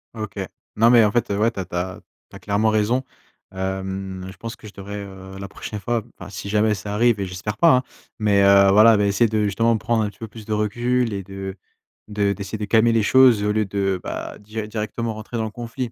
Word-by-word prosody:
OK, 110 -2 -6 0.4
non, 115 +2 +5
mais 120 -2 +7
en 105 - +1
fait, 120 - 0
heu, 100 - -1
ouais 115 +2 +2
tu 100 - -8
as 95 - -3
tu 90 - -9
as 90 +1 -3 0.3
tu - - -13
as - - -9
clairement 105 +2 +1
raison, 110 +4 +1 0.5
hem, 95 0 -4
je 95 - -16
pense 115 +1 -7
que 110 - -13
je 105 - -12
devrais, 100 +1 -7
heu, 95 -1 -10
la 100 - -6
prochaine 105 - -7
fois 115 +2 -1 0.2
enfin, - - -9
si 100 +1 -6
jamais 105 +1 +2
ça 100 +1 -5
arrive 115 -1 +3
et 100 - -1
j'espère 100 +4 -5
pas, 165 -5 +6
hein, 130 - -1 0.3
mais 105 -3 +3
heu, 100 0 +6
voilà, 110 +2 +7
bah, 105 - +2
essayer 100 +3 +2
justement 115 +3 +2
de - - -2
prendre 115 -1 +1
un 105 - -1
petit - - -18
peu 115 - -6
plus 110 0 -12
de 110 - -2
recul 120 +3 0
et 100 - -3
de 95 0 -7 0.5
de 100 -1 0
d'essayer 100 +2 -6
de 105 - -3
calmer 110 +2 +4
les 115 -1 +2
choses 125 -3 +5
au 105 - +1
lieu 105 0 +1
de, 95 -1 -1
bah, - - -5
dir 105 +1 -6
directement 110 +1 -3
rentrer 110 +2 -7
dans 110 - -1
le 110 - -5
conflit, 120 +1 -5
105 Hz, 250 wpm, -22 LUFS, 100-115 Hz, 0.5 s, mais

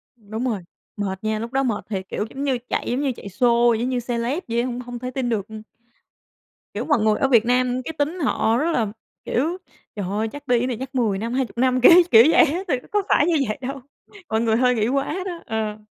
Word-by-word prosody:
Đúng 220 +2 -6
rồi, 215 -7 -2 0.3
mệt 195 -1 -4
nha, 215 0 -1
lúc 230 +1 -5
đó 270 0 +1
mệt 230 -5 -2
thiệt, 190 -2 -4
kiểu, 210 - -2
giống 270 +3 -6
như 270 -3 +1
chạy, - - -2
giống 250 - 0
như 280 -2 0
chạy 200 - -9
sô 235 +3 +3
giống 240 +3 -1
như 250 - 0
celeb 245 +8 -1
vậy 235 0 -1
á, - - -2
hông 245 -1 -4
hông 245 -1 -7
thể 250 +1 -5
tin 255 -1 -2
được. 210 -4 -1
Ừm. 220 0 -9 1.1
Kiểu, - - -3
mọi 290 -5 +2
người 215 -1 +2
ở 270 - +3
Việt 235 -4 +4
Nam 250 +1 +1
cái 320 - -5
tính 310 +5 -1
họ 230 -5 +1
rất 315 +6 +1
là, 230 -9 +1 0.4
kiểu, 320 +9 0 0.4
trời 205 -3 -3
ơi 210 +3 -1
chắc 290 +5 -10
đi 245 -2 +3
cái 250 - -1
này 245 -3 -3
chắc 265 +1 -7
10 220 -6 +1
năm 230 +4 -4
20 255 -2 -2
năm, 255 +1 +2
kiểu, 250 - +9 0.2
kiểu 225 0 +9
vậy 330 - +6
á. 320 +4 -2
Thiệt 260 -7 0
ra - - -19
có 415 -1 +2
phải - - +4
như 335 -1 +2
vậy 215 - -3
đâu, 270 +1 -5 0.5
mọi 220 0 +1
người 225 -1 +2
hơi 250 0 +3
nghĩ 215 -1 +1
quá 275 +5 -1
đó, 350 -3 -5
ờ. 220 -1 -3
245 Hz, 255 wpm, -22 LUFS, 220-270 Hz, 1.1 s, kiểu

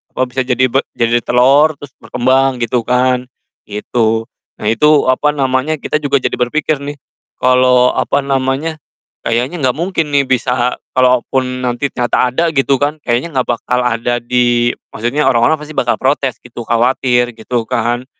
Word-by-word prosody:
oh, 130 - +1
bisa 130 0 -2
jadi 130 0 +2
b 135 - +2 0.2
jadi 120 0 +2
telor 140 +6 +4
terus 145 -3 -12
berkembang 130 0 +1
gitu 120 +1 0
kan, 125 0 +1 0.4
gitu. 110 +2 -1 0.3
Nah - - -8
itu, 150 +4 +3
apa 150 +3 +2
namanya, 135 +3 0
kita 150 +2 -2
juga 140 -1 +2
jadi - - -2
berpikir 145 +4 -1
nih, 145 +1 -6 0.4
kalau, 125 0 +3
apa 140 0 0
namanya, 135 +3 -1 0.4
kayaknya 125 +8 -2
enggak 130 +1 0
mungkin 170 -3 -1
nih 140 -1 +3
bisa 125 -1 0 0.2
kalaupun 125 0 +1
nanti 125 +3 -2
ternyata 125 +1 0
ada, 170 +4 +1
gitu 135 -2 +1
kan, 150 +2 0
kayaknya 120 +7 0
enggak 125 -1 +1
bakal 125 +2 -1
ada 120 +1 0
di 120 0 +1 0.2
maksudnya, 120 +7 0
orang-orang 130 +6 +2
pasti 150 0 -10
bakal 120 -1 +2
protes, 135 -1 0
gitu, 120 0 -9
khawatir. 120 0 +1
Gitu 115 +1 -3
kan 120 +2 -1
125 Hz, 160 wpm, -15 LUFS, 120-140 Hz, 0.4 s, telor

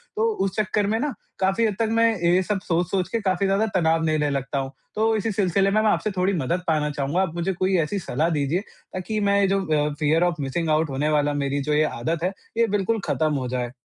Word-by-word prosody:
तो 440 - +1 0.2
उस 195 - -3
चक्कर 210 -1 0
में 220 +2 0
ना 290 0 -1 0.3
काफ़ी 195 +4 +2
हद 210 - 0
तक 225 - +2
मैं 230 0 +4 0.2
ये 175 +2 +4
सब 205 0 -1
सोच-सोच 180 +1 -1
के 230 - -1
काफ़ी 195 0 0
ज़्यादा 195 +3 +2
तनाव 165 -2 +2
लेने 155 -2 +1
लगता 140 0 -2
हूँ। 135 0 -4 0.2
तो 220 +1 +2
इसी 220 +1 -1
सिलसिले 195 -1 +1
में 215 +1 +3
मैं 220 - +3
आपसे 215 - 0
थोड़ी 185 +2 +2
मदद 170 +2 -1
पाना 155 -2 +1
चाहूँगा 145 +5 -1
आप 170 -3 -2
मुझे 175 +3 -1
कोई 185 +2 0
ऐसी 165 +5 -1
सलाह 155 0 -1
दीजिए 150 +2 0 0.3
ताकि 200 +4 -3
मैं 200 0 +3
जो 195 0 +1
अ, 150 -1 +1
फियर 155 +3 +2
ऑफ 175 -1 +1
मिसिंग 145 +4 -2
आउट 155 0 +2
होने 140 +3 -1
वाला 145 -1 +2
मेरी 140 0 -1
जो - - +3
ये 150 +1 +4
आदत 155 +4 -2
है 185 +2 0 0.2
ये 230 0 +4
बिल्कुल 205 +2 0
खत्म 155 -1 +1
हो 130 -2 -2
जाए। 125 -1 -3
175 Hz, 240 wpm, -24 LUFS, 150-200 Hz, 0.3 s, मैं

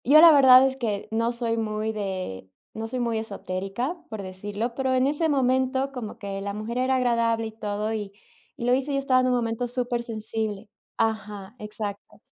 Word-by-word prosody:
Yo, 290 +5 +8
la 335 +1 +10
verdad, 265 -3 +8
es 265 0 -1
que 215 -6 -2
no 230 +1 +1
soy 235 -1 -2
muy 215 0 -1
de 185 - -5 0.2
no 225 0 -4
soy 255 +2 -4
muy 230 -2 0
esotérica, 200 - -4
por 220 -3 -5
decirlo, 205 +5 -4
pero 265 +1 0
en 255 0 +3
ese 300 +3 +1
momento, 260 0 +1
como 245 -5 -6
que 195 -1 -5
la 200 0 -3
mujer 215 +3 -4
era 260 +1 +2
agradable 230 -2 +1
y - - -7
todo, 215 0 -3
y 205 -2 -4 0.5
y 235 - -4
lo 245 - +4
hizo, 270 +3 0
y - - 0
yo - - +2
estaba 260 -2 +3
en 255 - +1
un 250 - +2
momento 235 0 -1
super 245 0 -1
sensible. 220 -2 -4 0.3
Ajá, 210 -2 -2
exacto. 210 -1 -6
230 Hz, 200 wpm, -25 LUFS, 210-255 Hz, 0.5 s, la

